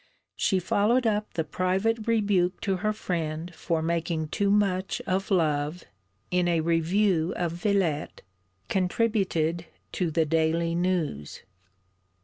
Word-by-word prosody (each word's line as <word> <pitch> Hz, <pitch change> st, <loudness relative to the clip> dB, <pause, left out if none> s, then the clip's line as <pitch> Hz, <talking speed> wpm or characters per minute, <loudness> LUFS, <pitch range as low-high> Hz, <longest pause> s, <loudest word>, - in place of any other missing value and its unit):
She 190 Hz, -, +1 dB
followed 215 Hz, +7 st, +2 dB
up 210 Hz, -1 st, 0 dB
the 160 Hz, -, 0 dB
private 195 Hz, +7 st, -1 dB
rebuke 200 Hz, -5 st, +2 dB
to 195 Hz, -3 st, 0 dB
her 215 Hz, +3 st, 0 dB
friend 170 Hz, -4 st, -3 dB
for 160 Hz, 0 st, -2 dB
making 165 Hz, -1 st, -1 dB
too 200 Hz, +3 st, 0 dB
much 195 Hz, -2 st, +1 dB
of 190 Hz, +1 st, -1 dB
love, 155 Hz, -2 st, 0 dB, 0.5 s
in 180 Hz, -1 st, +2 dB
a 170 Hz, -2 st, +2 dB
review 170 Hz, +2 st, +1 dB
of 175 Hz, -2 st, -1 dB
Villette, 175 Hz, -4 st, -1 dB, 0.4 s
contributed 180 Hz, -4 st, 0 dB, 0.2 s
to 180 Hz, -3 st, -1 dB
the 160 Hz, 0 st, +1 dB
_Daily 165 Hz, +2 st, +1 dB
News. 170 Hz, -, -2 dB
180 Hz, 125 wpm, -27 LUFS, 165-200 Hz, 0.5 s, followed